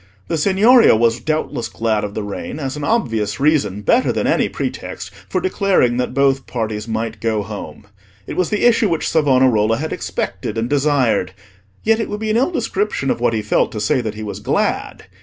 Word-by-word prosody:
The 165 Hz, -, 0 dB
Signoria 210 Hz, -, +5 dB
was 115 Hz, +1 st, +2 dB
doubtless 155 Hz, -3 st, -2 dB
glad 110 Hz, -2 st, -1 dB
of 105 Hz, 0 st, -5 dB
the 110 Hz, -, -3 dB
rain, 105 Hz, +7 st, -6 dB
as 135 Hz, -2 st, -4 dB
an 150 Hz, -, -6 dB
obvious 115 Hz, -, 0 dB
reason, 135 Hz, -9 st, +1 dB
better 245 Hz, -, +3 dB
than -, -, -1 dB
any -, -, +2 dB
pretext, -, -, -5 dB, 0.2 s
for 185 Hz, -, 0 dB
declaring 185 Hz, -9 st, +1 dB
that 125 Hz, -, -2 dB
both 135 Hz, -1 st, +2 dB
parties 110 Hz, -2 st, -3 dB
might 110 Hz, -1 st, -3 dB
go 110 Hz, -2 st, 0 dB
home. 105 Hz, +1 st, -8 dB, 0.4 s
It -, -, -6 dB
was 185 Hz, -3 st, 0 dB
the 210 Hz, +2 st, 0 dB
issue 230 Hz, -3 st, +4 dB
which 165 Hz, -2 st, -1 dB
Savonarola 130 Hz, -7 st, +3 dB
had 160 Hz, +2 st, -3 dB
expected 110 Hz, -, -4 dB
and 115 Hz, +1 st, -1 dB
desired; 135 Hz, -9 st, +1 dB, 0.5 s
yet 225 Hz, +1 st, +3 dB
it 225 Hz, -, -2 dB
would 210 Hz, -, -4 dB
be 215 Hz, 0 st, -2 dB
an 220 Hz, -, +2 dB
ill 260 Hz, +7 st, +2 dB
description 210 Hz, -, -1 dB
of -, -, -2 dB
what 120 Hz, -, +2 dB
he 110 Hz, -1 st, -1 dB
felt 105 Hz, -, +1 dB
to 110 Hz, -, -4 dB
say 125 Hz, +6 st, +1 dB
that 110 Hz, -2 st, -4 dB
he 110 Hz, -, -6 dB
was 105 Hz, -, -6 dB
glad. -, -, -1 dB
130 Hz, 200 wpm, -19 LUFS, 110-180 Hz, 0.5 s, Signoria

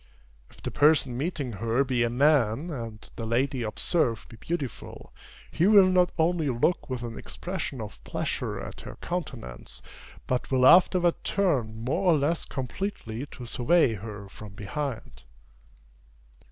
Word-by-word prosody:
If -, -, -19 dB
the -, -, -3 dB
person 145 Hz, -4 st, +4 dB
meeting 140 Hz, -2 st, -2 dB
her 115 Hz, +5 st, +1 dB
be 125 Hz, -3 st, 0 dB
a 120 Hz, -, +2 dB
man, 140 Hz, +2 st, +2 dB
and 115 Hz, -6 st, -7 dB
the 115 Hz, -, -4 dB
lady 130 Hz, +3 st, 0 dB
observed 115 Hz, +1 st, 0 dB
be 115 Hz, -, -12 dB
beautiful, 145 Hz, -1 st, -5 dB, 0.4 s
he 175 Hz, -, +2 dB
will 205 Hz, -2 st, +8 dB
not 180 Hz, -1 st, +3 dB
only 165 Hz, -2 st, +2 dB
look 130 Hz, +8 st, 0 dB
with 125 Hz, -2 st, -3 dB
an 115 Hz, -1 st, -6 dB
expression 180 Hz, -7 st, -5 dB
of 105 Hz, -, -8 dB
pleasure -, -, -3 dB
at -, -, -8 dB
her -, -, -9 dB
countenance, 130 Hz, -, -6 dB, 0.4 s
but 125 Hz, -1 st, -1 dB
will 130 Hz, -1 st, +3 dB
afterward 175 Hz, +2 st, +5 dB
turn 120 Hz, -, 0 dB
more 175 Hz, +8 st, +2 dB
or -, -, +3 dB
less 150 Hz, +4 st, 0 dB
completely 130 Hz, -, -4 dB
to 125 Hz, -, -10 dB
survey 125 Hz, +3 st, +3 dB
her 105 Hz, -1 st, -7 dB
from 100 Hz, +1 st, -11 dB
behind. 130 Hz, +4 st, -5 dB
130 Hz, 145 wpm, -27 LUFS, 115-165 Hz, 0.4 s, will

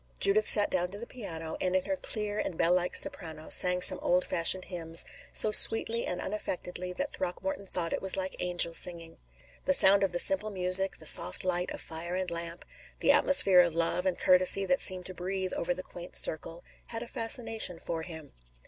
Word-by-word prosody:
Judith 210 Hz, +2 st, +2 dB
sat 205 Hz, -1 st, +1 dB
down 180 Hz, -1 st, -2 dB
to 200 Hz, -, -10 dB
the 230 Hz, -, -10 dB
piano 165 Hz, -10 st, -9 dB
and 185 Hz, 0 st, -3 dB
in 185 Hz, -, -1 dB
her 290 Hz, -, -5 dB
clear 210 Hz, -6 st, -4 dB
and 170 Hz, -, -6 dB
bell 170 Hz, -, 0 dB
like 180 Hz, 0 st, -3 dB
soprano 165 Hz, -, 0 dB
sang 180 Hz, 0 st, +4 dB
some -, -, +6 dB
old 180 Hz, +1 st, -1 dB
fashioned 180 Hz, +2 st, +2 dB
hymns, 165 Hz, -2 st, -2 dB, 0.3 s
so 215 Hz, -, +4 dB
sweetly 225 Hz, +2 st, +5 dB
and 180 Hz, -, -5 dB
unaffectedly 180 Hz, -3 st, -6 dB
that 280 Hz, +10 st, -6 dB
Throckmorton 190 Hz, +2 st, -6 dB
thought 170 Hz, -3 st, -4 dB
it -, -, -5 dB
was 190 Hz, 0 st, +2 dB
like 190 Hz, 0 st, -6 dB
angels 175 Hz, -2 st, +1 dB
singing. 165 Hz, -2 st, -1 dB, 0.5 s
The 280 Hz, -, +1 dB
sound 195 Hz, -2 st, +3 dB
of 195 Hz, -, -2 dB
the 175 Hz, -, -4 dB
simple 215 Hz, +1 st, +3 dB
music, 190 Hz, 0 st, +1 dB
the 155 Hz, -, -10 dB
soft 90 Hz, -, +3 dB
light 180 Hz, -1 st, -3 dB
of -, -, -9 dB
fire 170 Hz, +2 st, -8 dB
and 185 Hz, -1 st, -5 dB
lamp, 170 Hz, 0 st, -8 dB, 0.3 s
the -, -, +1 dB
atmosphere 195 Hz, -10 st, +4 dB
of 170 Hz, -2 st, 0 dB
love 170 Hz, +2 st, -3 dB
and 180 Hz, -, -3 dB
courtesy 185 Hz, +1 st, +3 dB
that 270 Hz, +6 st, -1 dB
seemed 185 Hz, -2 st, +3 dB
to 185 Hz, -, -7 dB
breathe 185 Hz, +1 st, -6 dB
over 170 Hz, -, -4 dB
the 185 Hz, +1 st, -6 dB
quaint 175 Hz, -1 st, -13 dB
circle, 165 Hz, +2 st, -2 dB, 0.2 s
had 230 Hz, 0 st, -8 dB
a -, -, -12 dB
fascination 225 Hz, -5 st, 0 dB
for 165 Hz, 0 st, -7 dB
him. 160 Hz, -3 st, -13 dB
180 Hz, 200 wpm, -26 LUFS, 170-195 Hz, 0.5 s, some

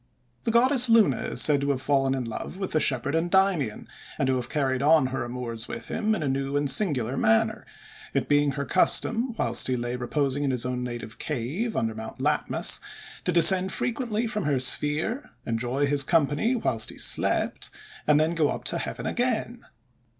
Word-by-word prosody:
The -, -, 0 dB
goddess 250 Hz, +1 st, +6 dB
Luna 230 Hz, -3 st, +4 dB
is -, -, +1 dB
said 145 Hz, -2 st, +5 dB
to 140 Hz, -, -2 dB
have 140 Hz, -2 st, 0 dB
fallen 135 Hz, -1 st, 0 dB
in 130 Hz, -, -3 dB
love 115 Hz, +10 st, -7 dB
with 190 Hz, -1 st, -5 dB
the 155 Hz, -, +1 dB
shepherd 135 Hz, 0 st, +1 dB
Endymion, 175 Hz, -, 0 dB, 0.3 s
and -, -, 0 dB
to 130 Hz, 0 st, +1 dB
have 120 Hz, -1 st, -5 dB
carried 135 Hz, -3 st, -1 dB
on 150 Hz, 0 st, +4 dB
her 135 Hz, -, -2 dB
amours 120 Hz, -2 st, -5 dB
with 115 Hz, -1 st, -8 dB
him 215 Hz, 0 st, -1 dB
in 175 Hz, -, -4 dB
a -, -, -2 dB
new 135 Hz, +1 st, -2 dB
and 145 Hz, 0 st, 0 dB
singular 135 Hz, -, 0 dB
manner; 110 Hz, 0 st, +1 dB, 0.5 s
it -, -, 0 dB
being 145 Hz, -1 st, +2 dB
her 140 Hz, +1 st, -4 dB
custom, 230 Hz, -, +1 dB
whilst 120 Hz, +1 st, -1 dB
he 130 Hz, -1 st, -1 dB
lay 120 Hz, +1 st, -4 dB
reposing 135 Hz, +3 st, -2 dB
in 140 Hz, -, 0 dB
his 125 Hz, -2 st, 0 dB
native 120 Hz, -3 st, -5 dB
cave, 155 Hz, -, -3 dB
under 115 Hz, -1 st, -1 dB
Mount 110 Hz, 0 st, -9 dB
Latmus, -, -, +1 dB, 0.5 s
to -, -, +1 dB
descend 180 Hz, +2 st, +6 dB
frequently 235 Hz, -2 st, -2 dB
from 215 Hz, -4 st, -3 dB
her 140 Hz, -3 st, +1 dB
sphere, 150 Hz, -, 0 dB, 0.2 s
enjoy 125 Hz, +5 st, -1 dB
his 145 Hz, 0 st, +2 dB
company 165 Hz, -, +1 dB
whilst 115 Hz, -, -1 dB
he -, -, -9 dB
slept, -, -, +1 dB, 0.4 s
and 150 Hz, 0 st, +4 dB
then 160 Hz, +2 st, +1 dB
go 160 Hz, -3 st, +1 dB
up -, -, -5 dB
to -, -, -1 dB
heaven -, -, -5 dB
again. 240 Hz, -1 st, -2 dB
145 Hz, 185 wpm, -25 LUFS, 125-190 Hz, 0.5 s, goddess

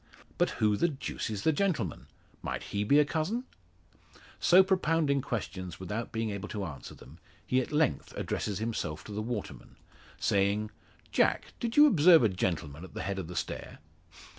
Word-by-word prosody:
But -, -, +3 dB
who 105 Hz, -1 st, +3 dB
the 170 Hz, -, +3 dB
deuce 140 Hz, -5 st, -4 dB
is 105 Hz, -2 st, -4 dB
the 160 Hz, -, +4 dB
gentleman? 115 Hz, -, -1 dB, 0.3 s
Might -, -, -4 dB
he 100 Hz, 0 st, +1 dB
be 140 Hz, +8 st, +4 dB
a 150 Hz, -, +6 dB
cousin?" 170 Hz, -, -1 dB, 1.0 s
So 185 Hz, +2 st, +7 dB
propounding 165 Hz, -7 st, +2 dB
questions 95 Hz, -7 st, -5 dB
without 105 Hz, +5 st, -4 dB
being 110 Hz, -1 st, -2 dB
able 100 Hz, +1 st, -5 dB
to 105 Hz, -3 st, -3 dB
answer 70 Hz, -6 st, -8 dB
them, 70 Hz, +7 st, -15 dB, 0.3 s
he 130 Hz, 0 st, +2 dB
at -, -, -6 dB
length 150 Hz, -, +1 dB
addresses 100 Hz, -3 st, -2 dB
himself 105 Hz, -9 st, -3 dB
to -, -, -10 dB
the 105 Hz, +1 st, -3 dB
waterman, 115 Hz, -2 st, -6 dB, 0.4 s
saying: 100 Hz, +2 st, +1 dB, 0.4 s
"Jack, -, -, +1 dB
did 235 Hz, +2 st, -3 dB
you 295 Hz, -, +10 dB
observe 170 Hz, -, +7 dB
a 110 Hz, -, +4 dB
gentleman 85 Hz, -5 st, -2 dB
at 95 Hz, -, -12 dB
the -, -, -3 dB
head 100 Hz, 0 st, -2 dB
of 90 Hz, -, -5 dB
the 90 Hz, -, -8 dB
stair?" -, -, -4 dB
110 Hz, 175 wpm, -30 LUFS, 95-150 Hz, 1.0 s, you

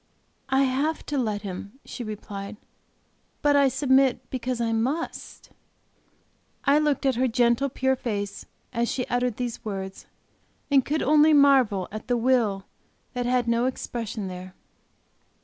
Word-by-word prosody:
"I 270 Hz, +1 st, +3 dB
have 275 Hz, +4 st, 0 dB
to 290 Hz, -, -2 dB
let 215 Hz, -4 st, -2 dB
Him," 200 Hz, +1 st, -6 dB
she 245 Hz, -, -6 dB
replied; 205 Hz, -1 st, -7 dB, 0.9 s
"but 290 Hz, -1 st, +4 dB
I 280 Hz, -1 st, +5 dB
submit 265 Hz, -2 st, +2 dB
because 255 Hz, -1 st, -3 dB
I 230 Hz, -1 st, 0 dB
must." 260 Hz, +9 st, -3 dB, 1.1 s
I 285 Hz, +1 st, +5 dB
looked 295 Hz, -3 st, 0 dB
at 265 Hz, -3 st, +2 dB
her 260 Hz, +1 st, +2 dB
gentle, 240 Hz, +3 st, +2 dB
pure 265 Hz, +1 st, +1 dB
face 205 Hz, -5 st, -4 dB, 0.3 s
as 235 Hz, -1 st, 0 dB
she 250 Hz, -, -2 dB
uttered 245 Hz, -2 st, 0 dB
these 245 Hz, -2 st, -4 dB
words, 195 Hz, -2 st, -6 dB, 0.6 s
and 275 Hz, -2 st, +5 dB
could 305 Hz, +4 st, -1 dB
only 305 Hz, +2 st, +5 dB
marvel 265 Hz, -10 st, +4 dB
at 215 Hz, +3 st, -7 dB
the 245 Hz, -1 st, +1 dB
will 230 Hz, -5 st, +1 dB, 0.5 s
that 245 Hz, -1 st, -2 dB
had 245 Hz, -1 st, +1 dB
no 235 Hz, +2 st, +2 dB
expression 225 Hz, -5 st, -4 dB
there. 185 Hz, 0 st, -8 dB
245 Hz, 145 wpm, -25 LUFS, 215-270 Hz, 1.1 s, I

